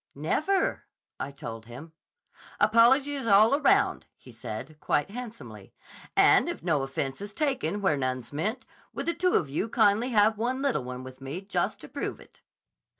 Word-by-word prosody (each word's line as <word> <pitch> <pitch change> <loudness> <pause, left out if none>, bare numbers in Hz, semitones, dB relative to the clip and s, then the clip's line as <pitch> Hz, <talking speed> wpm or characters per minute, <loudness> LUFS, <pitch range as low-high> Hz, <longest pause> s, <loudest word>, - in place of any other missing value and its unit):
'Never,' 310 - 0 0.3
I - - -3
told 115 -5 -8
him. 140 +7 -11 0.7
'Apologies 260 +5 +4
all 220 +8 +5
round,' 390 +6 +2
he 125 - -15
said, 115 +6 -8
quite 150 +4 0
handsomely. 210 - -9 0.4
'And - - +5
if - - -6
no 140 - +1
offense 135 +2 -4
is 205 0 -6
taken 265 -8 -1
where 155 -7 +2
none's 130 -1 -3
meant, 215 - -2 0.3
would - - -4
the 340 - +1
two 365 +1 +1
of 160 - +2
you 155 +11 -2
kindly 215 +4 +3
have 215 -2 +3
one 250 +3 -1
little 270 - 0
one 125 0 -7
with 130 0 -11
me 135 +6 -5
just 195 +1 -2
to - - -9
prove - - -5
it?" - - -19
200 Hz, 165 wpm, -27 LUFS, -, 0.7 s, all